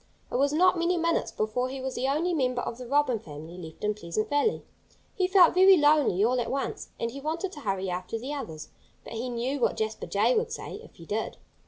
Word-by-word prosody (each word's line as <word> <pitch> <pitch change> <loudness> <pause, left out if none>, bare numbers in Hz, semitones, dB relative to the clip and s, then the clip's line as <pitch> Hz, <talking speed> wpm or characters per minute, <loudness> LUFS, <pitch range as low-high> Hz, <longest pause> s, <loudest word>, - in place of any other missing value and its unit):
It - - 0
was 280 +2 +3
not 360 +3 +4
many 345 +1 +1
minutes 335 0 0
before 235 +4 -1
he 270 +1 -5
was 260 0 -4
the 260 - -1
only 320 +6 +1
member 255 -5 0
of 235 - -5
the 250 - -7
Robin 275 -3 +2
family 155 0 -10
left 160 -2 -10
in 210 0 +1
Pleasant 210 +3 -3
Valley. 290 +10 +1 0.5
He 370 -2 +1
felt 370 -2 +6
very 375 +1 +7
lonely, 290 - +4
all 250 +1 +2
at - - -3
once. 275 +1 -3
And 230 - -2
he 275 +3 -8
wanted 330 +6 -2
to 305 - -9
hurry 195 -6 -2
after 180 +4 -3
the 260 +6 -5
others. 160 - -6 0.3
But - - -9
he 235 +3 -3
knew 245 +4 -2
what 240 - +1
Jasper 220 0 -3
Jay 215 +5 +2
would 445 +1 0
say, 420 - -6
if - - -16
he 165 - -13
did. 215 +5 -3
255 Hz, 230 wpm, -28 LUFS, 215-310 Hz, 0.5 s, very